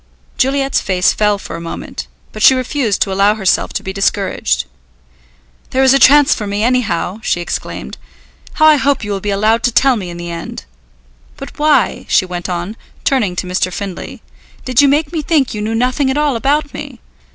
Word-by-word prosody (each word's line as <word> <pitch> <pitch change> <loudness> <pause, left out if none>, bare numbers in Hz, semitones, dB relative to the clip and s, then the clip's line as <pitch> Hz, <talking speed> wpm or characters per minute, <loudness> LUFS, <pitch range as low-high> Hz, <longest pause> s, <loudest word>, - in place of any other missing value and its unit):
Juliet's 275 0 +1
face 180 -2 +1
fell 210 -1 +1
for 195 - -8
a 170 - -7
moment, 170 - -7 0.2
but 215 - -8
she 260 - +7
refused 255 -4 0
to 195 - -6
allow 200 +2 +3
herself 195 -4 0
to - - -3
be 190 - -5
discouraged. 195 - 0 1.0
"There 265 +1 +1
is 265 0 +5
a 275 - +4
chance 290 +2 +6
for 210 - -5
me, 205 +1 -2
anyhow!" 225 -5 0
she 175 - -1
exclaimed. 175 - -5 0.5
"How 310 - +3
I 310 -1 +7
hope 275 -2 0
you 205 - -4
will 200 - -2
be 205 - -4
allowed 215 +3 +2
to 245 - +1
tell 260 +1 +3
me 185 -4 -6
in 170 - -8
the 175 0 -6
end! 170 - -7 0.7
But 275 - -10
why," 300 0 +2
she 185 - +3
went 180 0 -5
on, 180 +5 -4 0.3
turning 220 -10 +1
to 180 - -3
Mr. 185 0 -1
Findlay, 195 -1 -7 0.4
"did 255 +1 +3
you 285 - +5
make 295 +3 +1
me 320 - -1
think 295 -4 +1
you 210 - -4
knew 220 +2 -2
nothing 255 +3 +1
at 265 - -1
all 295 -3 +1
about 285 +4 0
me. 285 -4 -8
225 Hz, 200 wpm, -15 LUFS, 195-275 Hz, 1.0 s, she